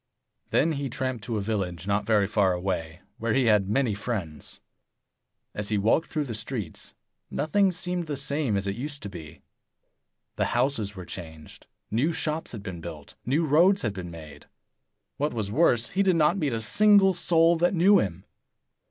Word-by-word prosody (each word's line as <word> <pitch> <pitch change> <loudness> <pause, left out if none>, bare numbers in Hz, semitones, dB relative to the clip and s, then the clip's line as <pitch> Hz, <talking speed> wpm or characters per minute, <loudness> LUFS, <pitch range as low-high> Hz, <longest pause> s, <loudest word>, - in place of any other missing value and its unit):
Then 165 - +2
he 140 -3 -3
tramped 130 -2 -3
to 115 -3 -2
a - - -1
village 95 -5 -3
not 100 +1 0
very 105 -3 +3
far 100 -2 +2
away, 90 -2 -3 0.2
where 115 +1 0
he 135 -2 +3
had 105 -4 +3
many 120 0 +1
friends. 100 -7 -5 0.9
85 - - -7
As 105 - -3
he 105 - +1
walked 110 +11 +2
through 155 -3 -1
the 125 -5 -5
streets, 110 -5 -5 0.3
nothing 190 +6 +1
seemed 180 -1 -3
the 145 - -3
same 140 -5 0
as 100 - -2
it 100 0 -2
used 145 +3 -4
to 100 - -5
be. 80 -6 -11 0.9
The - - +1
houses 120 -6 0
were 90 -2 -8
changed; 80 -4 -10 0.2
new 130 +10 +1
shops 160 0 -2
had 110 -4 -8
been 90 -4 -7
built; 80 -3 -9
new 150 +6 +2
roads 175 +7 +4
had 110 -4 -1
been 90 -3 -7
made. 80 -3 -11 0.7
What 145 -3 -1
was 105 -3 -3
worse, 120 -3 +3
he 195 - 0
did 190 -3 +3
not 160 +2 +3
meet 150 -9 -1
a 115 - -2
single 200 - +5
soul 170 -1 +4
that 175 +3 +2
knew 195 +4 +5
him. 95 -2 -3
115 Hz, 185 wpm, -26 LUFS, 100-155 Hz, 0.9 s, single